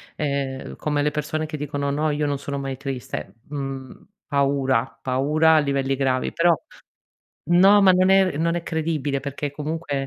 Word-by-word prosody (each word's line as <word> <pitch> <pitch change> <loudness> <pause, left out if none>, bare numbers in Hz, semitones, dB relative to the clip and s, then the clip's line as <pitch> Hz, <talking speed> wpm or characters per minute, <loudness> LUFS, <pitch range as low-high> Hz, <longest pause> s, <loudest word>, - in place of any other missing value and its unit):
Ehm, 140 -2 -3
come 150 -1 -1
le 150 - +1
persone 155 +1 -2
che 155 0 -6
dicono: 145 -1 -2
"No 150 +2 0
io 150 0 0
non 145 -1 -1
sono 140 0 -4
mai 135 -1 -4
triste". 135 -2 -6
Mhmm, 135 -2 -6 0.2
paura, 135 -5 +1
paura 150 +5 +3
a 155 - +6
livelli 135 -2 0
gravi; 130 -1 0
però 170 0 +4 1.0
no, 195 +4 +7
ma 190 - +7
non 185 +1 +3
è 190 -5 +4
non 170 +1 +1
è 170 - -3
credibile 155 -4 -1
perché 140 +1 -4
comunque 155 +1 -4
145 Hz, 165 wpm, -23 LUFS, 135-160 Hz, 1.0 s, no